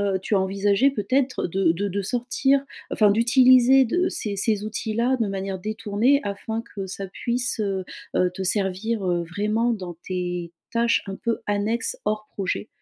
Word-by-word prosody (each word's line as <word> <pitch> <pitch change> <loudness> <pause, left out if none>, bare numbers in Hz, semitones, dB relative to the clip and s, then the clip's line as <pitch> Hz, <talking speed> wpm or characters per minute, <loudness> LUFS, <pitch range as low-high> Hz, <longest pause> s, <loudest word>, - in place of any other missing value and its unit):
heu, - - 0
tu 205 - 0
as 195 - +4
envisagé 200 +7 +2
peut-être 255 +3 0
de 180 -1 +2
de 200 +4 -2
de 200 +1 -2
sortir, 265 +4 +1 0.3
enfin, 210 -2 +4
d'utiliser 255 +3 +6
de 355 +10 +1
ces 205 -2 -3
ces 205 +1 +1
outils-là 225 +4 -1
de 225 - +2
manière 195 0 -3
détournée, 215 +7 +1
afin 220 +3 -4
que 195 -2 -4
ça 195 +1 -6
puisse, 240 +5 -1
heu 195 -3 -1 0.3
heu, 180 - +3
te 190 +1 -5
servir, 195 +3 0
heu, 175 -2 0
vraiment 210 +7 0
dans 180 -5 -6
tes, 180 -2 -3 0.2
tâches 235 0 +2
un 195 - -4
peu 230 +2 -2
annexes 215 - -1
hors 215 0 -1
projet? 195 +2 -3
210 Hz, 170 wpm, -24 LUFS, 190-235 Hz, 0.3 s, d'utiliser